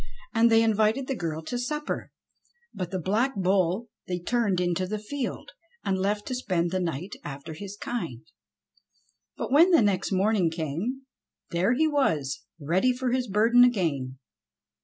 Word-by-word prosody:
And 230 0 +5
they 225 0 +5
invited 220 +4 +2
the 270 - -2
girl 160 -5 -4
to 245 +9 -3
supper, 300 +4 -3 0.6
but 180 -2 -4
the 190 - -2
Black 220 - +1
Bull 190 +2 +1 0.2
they 180 - -1
turned 205 -1 0
into 180 +1 0
the 215 +3 -2
field, 265 - -5 0.3
and 195 -1 +1
left 205 +2 0
to 255 - -4
spend 180 -9 -1
the 185 - 0
night 170 +1 -3
after 145 +2 -7
his 200 +5 -8
kind. 170 - -4 1.1
But - - -4
when 320 +6 +7
the 335 -10 +5
next 195 -2 +1
morning 195 -2 +2
came 170 - -3 0.5
there 185 +7 +2
he 315 +5 +3
was 160 - 0 0.2
ready 180 - +2
for 250 0 -2
his 255 0 0
burden 225 +4 +5
again. 155 - +1
200 Hz, 160 wpm, -27 LUFS, 170-245 Hz, 1.1 s, when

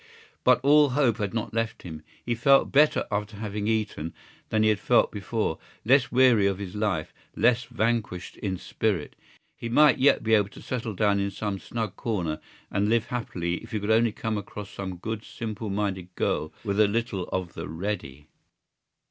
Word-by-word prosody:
But 125 -1 +5
all 145 +1 +6
hope 125 -4 +2
had 100 -3 -2
not 115 -1 -3
left 115 0 -2
him. 80 -3 -8 0.2
He 120 - 0
felt 135 +4 +4
better 150 +2 +4
after 105 0 -2
having 105 -1 -3
eaten 105 -8 -2 0.3
than 110 0 +2
he 110 - +4
had 105 - +2
felt - - +3
before, 105 -4 -2 0.3
less 130 +2 +4
weary 125 -5 +5
of 100 -1 0
his 95 -2 -6
life, 105 -7 -1 0.2
less 120 0 +3
vanquished 115 -5 -2
in 95 -3 -3
spirit. 95 -3 -2 0.4
He 115 - -6
might 145 +2 +5
yet 140 +2 +4
be 110 - +1
able 105 -2 +4
to - - -13
settle 115 -4 -3
down 100 +1 +2
in 100 0 0
some 100 0 -3
snug 110 -3 -4
corner 90 -9 -2 0.3
and 100 +1 +1
live 115 -1 +1
happily 85 -8 -2
if - - -11
he 110 - 0
could 105 +2 -1
only 115 +1 +4
come 110 -3 -2
across 105 0 -8
some 95 -2 -5
good 110 +4 -5
simple 110 -2 -5
minded 95 -3 -3
girl 80 - -1
with 100 -1 -1
a 105 - +6
little 105 -3 -1
of 90 -2 -3
the - - -6
ready. 80 -5 -4
105 Hz, 185 wpm, -26 LUFS, 95-115 Hz, 0.4 s, all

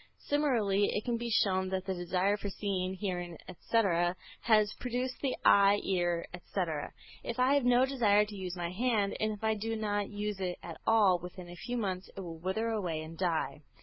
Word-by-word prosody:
Similarly 230 -9 +1
it 210 - -2
can 240 -1 0
be 235 0 -4
shown 190 -4 +2
that 190 0 -2
the 190 - -1
desire 185 +3 +1
for 205 -1 -5
seeing, 190 -1 -2
hearing, 175 -4 -4
etc., 180 -2 +1 0.3
has 215 -2 +4
produced 250 +1 -3
the 270 -2 0
eye, 200 0 +6
ear, 175 -3 0
etc. 175 -4 -3 0.3
If 235 - -4
I 255 +2 +4
have 285 -3 +2
no 245 +1 +5
desire 215 -6 +3
to 210 0 -9
use 185 -2 -5
my 170 -1 -3
hand, 210 -1 +1
and 215 0 +1
if 210 +1 -10
I 220 0 +3
do 225 +2 -3
not 205 -2 -1
use 205 -1 -3
it 180 -2 -2
at 170 -2 -8
all, 205 -5 +5
within 180 +1 -9
a - - -9
few 245 +7 -4
months 190 -4 -3
it - - -4
will 165 -3 -7
wither 190 +6 -1
away 180 -8 -2
and 160 +1 -9
die. 165 -3 -1
200 Hz, 200 wpm, -31 LUFS, 180-220 Hz, 0.3 s, eye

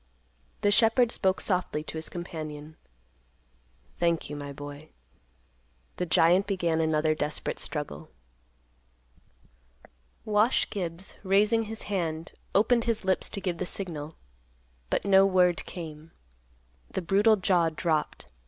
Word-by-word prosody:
The 205 - +3
shepherd 225 +2 +4
spoke 190 -4 +1
softly 180 -5 -1
to 155 - -7
his 160 0 -5
companion, 155 -3 -7 1.2
"Thank 170 -3 0
you, - - -4
my 145 -1 -6
boy." 145 +2 -9 1.1
The 180 - -2
giant 175 +5 +4
began 170 -5 0
another 155 -1 +2
desperate 150 -1 -3
struggle. 150 - -5 2.2
Wash 215 +3 +3
Gibbs, 180 -2 -4
raising 210 +4 +3
his 220 0 -4
hand, 165 -5 -3 0.2
opened 230 +3 +3
his 225 -4 -1
lips 190 0 +1
to 200 - -6
give 180 -3 -2
the 185 - -1
signal. 160 -6 -5 0.7
But - - 0
no 195 -1 +6
word 180 -2 +3
came. 160 -2 -8 0.8
The - - -4
brutal 205 +5 +4
jaw 180 -4 +2
dropped. 155 -1 -1
175 Hz, 120 wpm, -28 LUFS, 155-200 Hz, 2.2 s, no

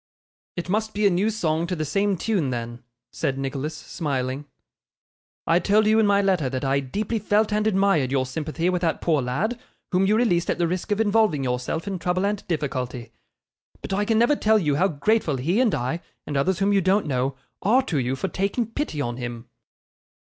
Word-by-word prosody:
'It 175 - -3
must 215 +3 -1
be 210 0 +1
a 200 - +5
new 190 +5 +2
song 170 -6 -1
to 180 - -2
the 155 -2 -2
same 200 +4 +1
tune 180 -7 0
then,' 120 -1 -4 0.3
said 135 -4 -2
Nicholas, 135 +3 -3
smiling. 135 -3 -3 1.0
'I 165 +1 +4
told 210 +3 +3
you 215 +1 +4
in 220 - +4
my 200 0 +3
letter 180 -9 +1
that 130 +1 -3
I 135 +1 +2
deeply 205 - -2
felt 210 +1 +1
and 210 +1 +1
admired 195 -10 +2
your 135 -1 +1
sympathy 155 +5 -3
with 180 -1 +1
that 165 -2 0
poor 155 -4 +1
lad, 185 - -2 0.3
whom 190 +1 +3
you 210 +2 +3
released 180 -8 +2
at - - +1
the 170 -1 +1
risk 180 +5 -3
of 205 - +1
involving 210 -9 +2
yourself 125 +7 -2
in 195 -2 -3
trouble 180 +3 0
and 205 0 -1
difficulty; 130 -7 -3 0.7
but - - -4
I 205 +2 +1
can 220 +1 +1
never 240 +6 +4
tell 220 -4 +3
you 155 -8 +1
how 190 - +4
grateful 170 -2 +1
he 170 - +1
and 235 -6 +2
I, 130 +8 -2 0.2
and 145 - -4
others 170 +7 +1
whom 200 +2 +2
you 195 - +4
don't 190 +3 +2
know, 135 -1 -1 0.3
are 245 +7 +3
to 165 - -1
you 130 +1 -1
for 165 - -2
taking 200 +6 -1
pity 230 - -3
on 120 -2 -3
him. 120 -1 -6
175 Hz, 205 wpm, -24 LUFS, 140-205 Hz, 1.0 s, a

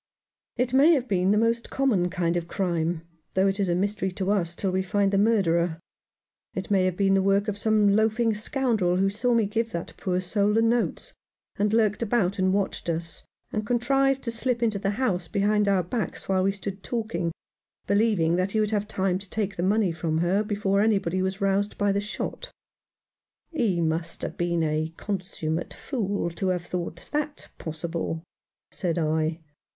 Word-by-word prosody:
"It 250 +1 0
may 290 +6 +6
have 260 -3 -1
been 185 -3 +2
the 210 - +4
most 230 +1 +1
common 220 -10 +1
kind 175 -2 0
of 170 -1 -2
crime, 170 -3 -1 0.3
though 190 +1 +4
it 195 +1 +1
is 195 -2 +1
a 175 - +2
mystery 195 0 -1
to 190 +1 -1
us 175 -4 0
till 190 +1 -1
we 190 +1 +1
find 195 +1 +1
the 195 - +4
murderer. 175 -6 +2 0.8
It - - -4
may 190 -2 +4
have 185 -1 -1
been 195 -1 +3
the 195 - +4
work 195 +2 +2
of 210 - -1
some 215 0 +3
loafing 220 +1 +2
scoundrel 215 -4 0
who 195 +1 +2
saw 235 +4 +1
me 225 -2 +3
give 225 +3 -1
that 170 - -4
poor 180 -1 -1
soul 200 +3 +1
the 225 - +4
notes, 240 - 0 0.4
and 205 +1 +1
lurked 215 -1 +2
about 200 -4 +1
and 185 0 +3
watched 195 -3 -1
us, 165 -1 -3 0.2
and 215 - -1
contrived 270 +4 +2
to 230 - -2
slip 240 +1 0
into 215 -3 +1
the 195 0 0
house 185 -10 0
behind 205 +2 +2
our 195 -2 +3
backs 215 +5 -3
while 190 -1 +2
we 195 +1 +2
stood 195 0 -6
talking, 220 -8 -2 0.5
believing 200 -6 +2
that 185 +2 0
he 220 - +2
would 215 0 +1
have 210 -1 0
time 190 -3 0
to 200 -1 -8
take 205 -2 -2
the 170 - -3
money 200 0 +2
from 160 -1 -2
her 175 +5 +2
before 205 -1 +1
anybody 195 -4 +1
was 190 +1 -2
roused 200 +1 +1
by 205 -1 +2
the 200 +1 0
shot." 215 - -5 0.5
" - - -57
He 210 - +1
must 165 +1 -2
have - - -4
been 170 -1 0
a 155 +1 0
consummate 175 -5 -3
fool 200 -9 -2
to 190 +3 -3
have 180 -2 -1
thought 175 -1 -5
that 300 0 -3
possible," 165 0 -4 0.5
said 175 -3 -2
I. 160 0 0
195 Hz, 190 wpm, -26 LUFS, 175-215 Hz, 0.8 s, may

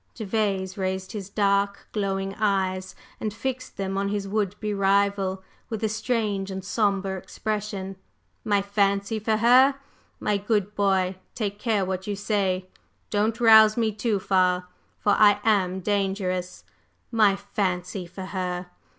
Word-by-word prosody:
Gervase 200 -3 -1
raised 190 0 -2
his 200 -3 -6
dark, 200 -1 +1
glowing 195 -2 -2
eyes 190 -3 0 0.2
and 215 - -2
fixed 255 +4 -5
them 195 0 -2
on 200 - 0
his 200 -1 -2
would 205 -1 -1
be 210 -1 -2
rival 195 -1 +1 0.3
with 220 -1 -4
a 220 - +2
strange 215 -3 -1
and 190 0 -6
sombre 195 -2 0
expression. 200 -2 -4 0.5
"My 205 -2 +2
'fancy' 200 +1 +1
for 215 +1 +1
her? 255 +5 +6 0.4
My 210 -1 +1
good 205 0 0
boy, 190 -2 +1 0.2
take 205 -3 -3
care 210 -3 +1
what 190 +1 -4
you 205 - -1
say! 195 -3 -1 0.4
Don't 215 +2 +1
rouse 220 -2 +7
me 225 -2 +2
too 210 0 -1
far, 185 -1 +2 0.3
for 205 - +2
I 205 -1 +5
am 190 -4 +2
dangerous! 190 -2 -1 0.5
My 215 -4 +4
'fancy' 185 -2 -3
for 185 +2 -8
her! 180 -1 -4
200 Hz, 140 wpm, -25 LUFS, 190-215 Hz, 0.5 s, rouse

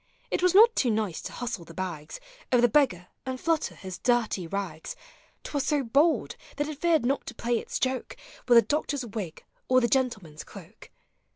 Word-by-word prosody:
It - - 0
was 365 0 +3
not 455 +3 +8
too 250 - +2
nice 215 -6 -1
to - - -7
hustle 240 -7 -4
the 165 0 -13
bags 170 -5 -5 0.3
Of 245 -1 +4
the - - +7
beggar, 210 - +2
and 260 -1 -4
tlutter 325 +3 0
his 185 -2 -8
dirty 235 -8 +1
rags: 175 -4 -5 0.5
T - - -8
was 285 -2 0
so 295 -3 +1
bold, 285 +8 +2 0.2
that 290 0 -1
it 305 -2 -7
feared 330 -6 +3
not 275 +3 0
to 240 - -7
play 235 0 0
its - - -4
joke 260 0 -2 0.3
With 240 -1 +7
the 230 - +8
doctor's 290 -3 -1
wig 200 -7 -6 0.2
or 255 0 +5
the 240 - +2
gentleman's 215 - -1
cloak. 200 +2 -13
240 Hz, 195 wpm, -27 LUFS, 190-280 Hz, 0.5 s, not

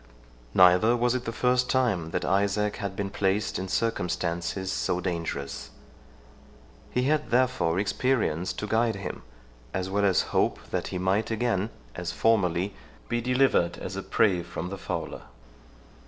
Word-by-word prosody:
Neither 90 +6 +6
was 120 0 +2
it 125 -1 -2
the 115 - -2
first 125 +2 +1
time 110 -11 +1
that 90 - -2
Isaac 100 +2 +1
had 100 -2 -4
been 100 0 -3
placed 100 +1 0
in 95 - -4
circumstances 90 -3 -1
so 90 - 0
dangerous. 80 -6 -4 1.2
He 125 - 0
had 150 +3 +1
therefore 125 -9 +2
experience 100 -4 0
to - - -4
guide 110 +1 +1
him, 100 -1 -6 0.5
as 95 0 -2
well 100 +1 +1
as 95 -3 +4
hope, - - +2
that - - -1
he - - -4
might 95 +4 +1
again, 115 -3 0 0.2
as 90 -1 -4
formerly, 100 -4 +2 0.4
be 120 0 0
delivered 125 -7 +2
as - - -6
a - - -3
prey 95 -5 +2
from 85 0 -5
the 100 - -5
fowler. - - -4
100 Hz, 150 wpm, -27 LUFS, 90-115 Hz, 1.2 s, Neither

